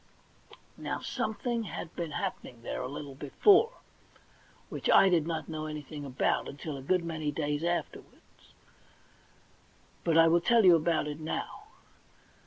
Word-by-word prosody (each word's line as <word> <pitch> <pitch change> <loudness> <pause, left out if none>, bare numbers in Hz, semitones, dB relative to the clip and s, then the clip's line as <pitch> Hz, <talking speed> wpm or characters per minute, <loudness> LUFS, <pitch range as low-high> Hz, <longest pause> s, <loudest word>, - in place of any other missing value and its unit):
Now, - - -3
something 235 +2 -2
had 170 -4 -7
been 170 -2 -3
happening 120 -5 -5
there - - -4
a 125 - -3
little 140 +1 -7
before, 385 - +4 0.9
which - - -4
I 195 - +7
did 165 -3 +2
not 165 -2 -3
know 155 -1 -4
anything 150 -1 -7
about 130 -2 0
until 145 +1 -6
a 135 - -7
good 180 +6 +1
many 160 -2 -3
days 145 0 -2
afterwards, 175 0 -5 1.5
but 165 -2 +2
I 165 0 +7
will 170 +1 +4
tell 230 +3 +4
you 180 -2 +8
about 165 0 +1
it 150 0 -5
now. 155 0 -5
160 Hz, 145 wpm, -30 LUFS, 145-175 Hz, 1.5 s, you